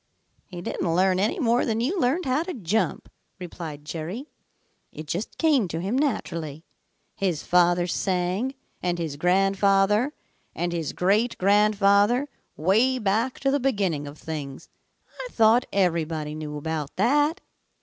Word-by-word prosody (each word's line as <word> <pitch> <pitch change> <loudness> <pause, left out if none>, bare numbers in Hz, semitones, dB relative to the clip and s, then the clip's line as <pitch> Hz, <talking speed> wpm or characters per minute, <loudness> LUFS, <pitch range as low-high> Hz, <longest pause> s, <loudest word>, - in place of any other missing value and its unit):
"He 175 -2 -8
didn't 165 -2 -2
learn 185 0 +3
any 210 - +1
more 245 -6 +2
than 225 -1 -1
you 305 +11 0
learned 300 +6 +1
how 260 +3 +1
to 360 +2 -5
jump," 215 0 -1 0.3
replied 165 -5 -8
Jerry. 175 - -6 0.6
"It 155 - -8
just 175 +8 -4
came 290 - +3
to 165 -1 -4
him 195 +7 -2
naturally. 165 - -2 0.5
His 180 -6 -1
father 175 0 +3
sang, 185 +8 -1 0.3
and 175 -1 -1
his 160 -4 -3
grandfather, 195 - +2 0.4
and 175 0 -2
his 165 -3 -3
great 210 +6 +1
grandfather, 205 +5 +3 0.3
way 220 +11 +3
back 225 +3 0
to 275 - +2
the 285 - +2
beginning 195 - 0
of 145 +1 -10
things. 145 -4 -7 0.5
I - - -4
thought 230 - +4
everybody 165 -5 0
knew 150 -1 -6
about 150 -1 -4
that." 290 - +2
195 Hz, 140 wpm, -25 LUFS, 165-240 Hz, 0.6 s, thought